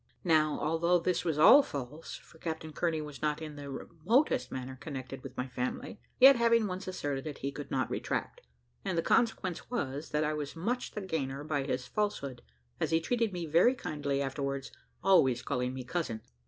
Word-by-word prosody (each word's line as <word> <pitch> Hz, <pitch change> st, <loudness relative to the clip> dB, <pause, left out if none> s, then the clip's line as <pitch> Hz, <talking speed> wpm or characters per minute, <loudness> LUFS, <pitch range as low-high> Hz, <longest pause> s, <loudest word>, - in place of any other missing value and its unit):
Now, 155 Hz, -3 st, +3 dB
although 165 Hz, +3 st, +2 dB
this 175 Hz, +1 st, 0 dB
was 160 Hz, -4 st, 0 dB
all 265 Hz, -, +9 dB
false, 145 Hz, -, -6 dB
for 160 Hz, -, -15 dB
Captain 160 Hz, -1 st, -5 dB
Kearney 165 Hz, -1 st, 0 dB
was 150 Hz, -2 st, -8 dB
not 150 Hz, 0 st, 0 dB
in 155 Hz, -2 st, -7 dB
the 145 Hz, -1 st, -7 dB
remotest 165 Hz, -, +1 dB
manner 130 Hz, 0 st, -5 dB
connected 135 Hz, -2 st, -7 dB
with 130 Hz, -1 st, -10 dB
my 125 Hz, -, -2 dB
family, 125 Hz, +10 st, -4 dB, 0.2 s
yet, 270 Hz, +2 st, +10 dB
having 230 Hz, -1 st, +4 dB
once 190 Hz, -1 st, -4 dB
asserted 145 Hz, -6 st, -3 dB
it, 145 Hz, -, -5 dB
he 140 Hz, -, -3 dB
could 140 Hz, 0 st, -7 dB
not 130 Hz, -, 0 dB
retract, -, -, -3 dB, 0.4 s
and 175 Hz, -, -1 dB
the 165 Hz, -, +2 dB
consequence 190 Hz, -7 st, +1 dB
was, 145 Hz, -, -3 dB
that 150 Hz, +1 st, +1 dB
I 155 Hz, 0 st, 0 dB
was 150 Hz, -2 st, -4 dB
much 235 Hz, +10 st, -2 dB
the 210 Hz, -, -4 dB
gainer 145 Hz, -7 st, -3 dB
by 145 Hz, -3 st, -1 dB
his 130 Hz, -2 st, -2 dB
falsehood, 140 Hz, -6 st, -2 dB, 0.4 s
as -, -, 0 dB
he 160 Hz, -, +3 dB
treated 230 Hz, +5 st, 0 dB
me 175 Hz, -2 st, -4 dB
very 170 Hz, -, +4 dB
kindly 145 Hz, -, -2 dB
afterwards, 140 Hz, 0 st, -3 dB, 0.3 s
always 130 Hz, -11 st, +4 dB
calling 125 Hz, -2 st, -1 dB
me 130 Hz, -, -5 dB
cousin. 125 Hz, -6 st, -3 dB
150 Hz, 190 wpm, -31 LUFS, 135-180 Hz, 0.4 s, yet